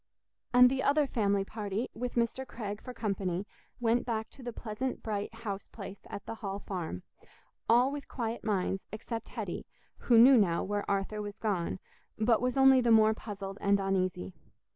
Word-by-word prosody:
And 250 0 +8
the 265 0 0
other 290 +2 +3
family 200 -6 +1
party, 210 +2 -3
with 245 +2 -4
Mr. 235 +2 0
Craig 210 -3 -5
for 250 - -7
company, 195 -5 -2 0.3
went 240 0 +2
back 220 -2 -3
to 275 - -14
the 240 -1 -5
pleasant 235 +3 -4
bright 205 -2 -2
house 205 -3 -6
place 200 -2 -9
at 200 - -7
the - - -5
Hall 195 -2 -3
Farm—all 200 - -2
with 285 -1 -6
quiet 230 -2 -4
minds, 195 -2 0
except 225 +2 -5
Hetty, - - -5 0.3
who 235 - +4
knew 255 +3 +9
now 170 -5 +2
where 205 +1 -2
Arthur 200 +2 -1
was 205 0 -6
gone, 190 -7 -1 0.4
but 220 +1 +3
was 250 +2 0
only 265 -1 +7
the 240 - +1
more 220 -1 +6
puzzled 200 -2 -7
and 200 0 +3
uneasy. 185 - -1
215 Hz, 170 wpm, -31 LUFS, 200-240 Hz, 0.4 s, knew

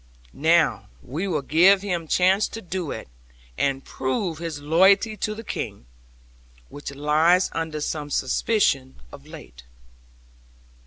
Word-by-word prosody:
Now, 165 +3 +2 0.2
we 160 +10 -4
will 155 -6 -1
give 185 +7 +4
him 175 -5 -3
chance 190 +5 +3
to 225 - -8
do 180 -3 -4
it, 110 - -6 0.5
and 135 - -1
prove 155 +5 -3
his 165 -3 -5
loyalty 190 +8 +3
to 215 +2 -3
the 225 - -8
King, 100 - -6 0.8
which 145 -1 -8
lies 155 +6 +3
under 160 -2 -3
some 150 -1 -3
suspicion 135 - 0 0.2
of - - -13
late.' - - -12
160 Hz, 125 wpm, -24 LUFS, 145-190 Hz, 0.8 s, give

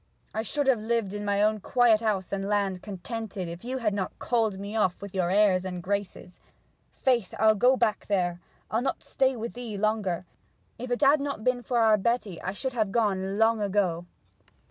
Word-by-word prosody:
I 220 - -1
should 285 +6 -1
have 260 -5 +3
lived 225 -3 -1
in 205 0 -4
my 205 0 +1
own 215 0 +2
quiet 235 +1 +3
house 200 -5 -1
and 195 0 -2
land, 200 -3 0
contented, 205 -1 -5
if 170 +1 -8
you 255 +2 -3
had 220 -5 0
not 195 -2 -3
called 225 -5 0
me 200 +2 -6
off 190 -5 +1
with 200 -1 -9
your 185 -2 0
airs 190 -2 +3
and 180 -2 -5
graces. 200 -2 -4 0.5
Faith, 240 -7 0
I'll 220 +1 +5
go 250 +5 +4
back 215 - 0
there; 180 -4 0 0.3
I'll 225 - +1
not 265 +1 -2
stay 265 -1 +1
with 230 0 -5
thee 240 -4 -6
longer! 200 -4 0 0.5
If 250 +1 -5
it 245 +2 -1
had 290 +2 +5
not 280 -6 -4
been 250 0 +1
for 245 +1 -2
our 220 -2 +5
Betty 210 -4 -1
I 190 - -3
should 260 +5 -3
have 215 -5 0
gone 195 -3 0
long 225 0 +3
ago!' 185 -4 0
210 Hz, 200 wpm, -27 LUFS, 195-235 Hz, 0.5 s, I'll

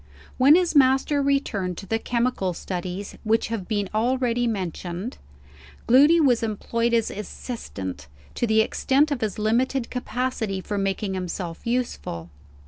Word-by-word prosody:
When 275 +4 +8
his 350 -2 +2
master 270 +1 +4
returned 230 - 0
to - - -7
the 225 +3 -1
chemical 235 -6 0
studies 185 +3 -5
which 225 0 +1
have 220 -5 -4
been 205 -3 -1
already 240 +1 +1
mentioned, 185 +1 -4 0.7
Gloody 290 +7 +6
was 255 -7 +4
employed 230 +2 0
as 230 -2 +1
assistant, 100 - -6 0.3
to 240 - -1
the 220 0 +4
extent 275 +6 +2
of 280 - -1
his 215 -3 -2
limited 235 +4 0
capacity 250 -5 -2
for 205 +2 -3
making 195 0 -1
himself 180 0 -5
useful. 230 - -3
225 Hz, 135 wpm, -24 LUFS, 195-255 Hz, 0.7 s, When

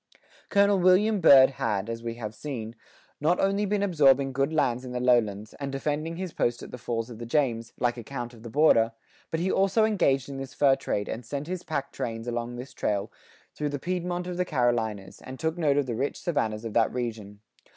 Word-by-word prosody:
Col. 200 -1 +4
William 190 +4 +4
Byrd 135 -4 +8
had, 105 -5 -2
as 115 0 -5
we 115 0 -4
have 110 -3 -6
seen, 115 -3 -6 0.4
not 165 +5 +2
only 200 +1 +1
been 205 0 0
absorbing 140 -7 +4
good 135 +3 0
lands 130 -6 +1
in 125 -1 -7
the 125 - -2
lowlands, 110 -4 +1
and 140 -1 -4
defending 150 +4 -2
his 185 -1 -5
post 120 0 -1
at - - -10
the 125 - -8
falls 115 0 -3
of 115 - -9
the 120 - -6
James, 115 -4 0
like 120 0 +1
a 120 - -7
Count 120 0 -6
of 115 - -14
the 115 - -8
Border, 115 -4 +4 0.4
but 160 - -2
he 185 +3 0
also 195 +3 +3
engaged 140 - +1
in 140 -1 -6
this 135 0 -7
fur 140 -2 +4
trade 105 -6 -3
and 120 - -5
sent 140 +5 -5
his 180 +1 -4
pack 150 -6 -4
trains 115 0 -5
along 120 0 -3
this 125 +2 -8
trail 100 0 -2 0.4
through 150 -1 -2
the 145 - -3
Piedmont 180 +2 -3
of 180 -1 -5
the 180 - +1
Carolinas,[87:5] 115 - -1
and 130 0 -9
took 160 +1 -2
note 145 -4 +2
of 145 - +2
the 125 - -3
rich 135 +5 -2
savannas 110 -10 -1
of 110 - -5
that 115 -1 +3
region. 110 -4 -5
135 Hz, 220 wpm, -27 LUFS, 115-160 Hz, 0.4 s, Byrd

